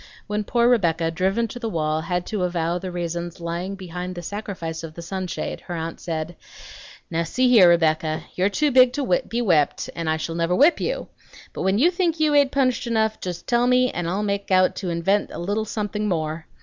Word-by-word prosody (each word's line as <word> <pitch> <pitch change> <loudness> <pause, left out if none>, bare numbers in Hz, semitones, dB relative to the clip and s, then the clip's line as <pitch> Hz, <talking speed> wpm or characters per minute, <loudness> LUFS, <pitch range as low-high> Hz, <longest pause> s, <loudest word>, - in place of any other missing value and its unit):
When 210 0 -2
poor 235 +1 +2
Rebecca, 170 -9 +2
driven 195 +7 0
to 245 - -7
the 230 - -3
wall, 155 -4 -1
had 180 +2 -2
to 210 -3 -3
avow 175 -1 0
the 185 - -5
reasons 175 0 -4
lying 170 +3 -4
behind 180 -1 -6
the 175 - -7
sacrifice 180 -4 -5
of 160 -1 -8
the 170 - -8
sunshade, 185 +1 -4
her 175 - -4
aunt 165 0 -5
said, 165 0 -4 0.8
"Now 165 0 0
see 250 +10 +1
here, 205 -8 +7
Rebecca, 160 -2 +2
you're 185 +2 +1
too 295 +7 +1
big 255 -1 +6
to 260 -10 +1
be 240 +1 -1
whipped, 160 -9 +1
and 165 -2 -2
I 160 - +1
shall 165 +1 -4
never 170 +1 0
whip 295 - +5
you; - - -2 0.4
but - - -5
when 190 +1 +2
you 325 +10 +4
think 345 -3 0
you 305 -1 +3
ain't 285 -2 +4
punished 255 -3 +1
enough, 220 -2 +1
just 180 -2 -5
tell 240 0 +2
me, 250 0 +3
and 175 -1 -3
I'll 195 +4 -1
make 200 -1 -2
out 185 -1 +4
to 185 - -3
invent 175 +5 +1
a - - -7
little 205 +5 -1
something 210 0 -3
more. 160 -3 -2
185 Hz, 215 wpm, -23 LUFS, 170-230 Hz, 0.8 s, here